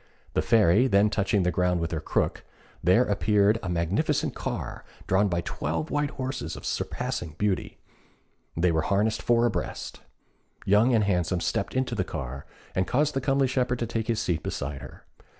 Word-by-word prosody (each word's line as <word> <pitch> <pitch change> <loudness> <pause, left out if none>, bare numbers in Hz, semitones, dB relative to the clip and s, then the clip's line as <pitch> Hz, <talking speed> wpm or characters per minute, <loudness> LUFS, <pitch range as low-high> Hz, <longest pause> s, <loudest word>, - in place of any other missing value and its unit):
The - - +2
Fairy 110 +2 +4
then 105 -2 +3
touching 100 -2 +1
the 90 - +1
ground 90 +1 +1
with 85 -1 -2
her 80 - -1
crook, - - -1 0.4
there 95 +8 +5
appeared 105 +1 +2
a 90 - -4
magnificent 90 - 0
car, - - -5 0.2
drawn 95 +2 +3
by 85 -2 0
twelve 80 -1 -3
white 145 +1 +1
horses 130 0 -4
of - - -9
surpassing 80 -3 -3
beauty. 105 -2 -1 0.8
They 85 +1 +3
were 80 -1 +1
harnessed 105 +6 +1
four 120 0 +3
abreast. 120 - -3 0.7
Young 110 +5 +4
and 110 - +3
Handsome 90 -3 +1
stepped 100 - -2
into 130 -1 0
the 100 -5 0
car, 70 -4 -6 0.3
and 95 0 0
caused 150 +4 +1
the 135 - -1
comely 135 +1 +2
shepherd 125 -1 0
to 120 - -2
take 115 -1 -3
his 115 -2 0
seat 85 -7 -1
beside 70 -1 -4
her. 65 - -12
100 Hz, 175 wpm, -27 LUFS, 85-120 Hz, 0.8 s, there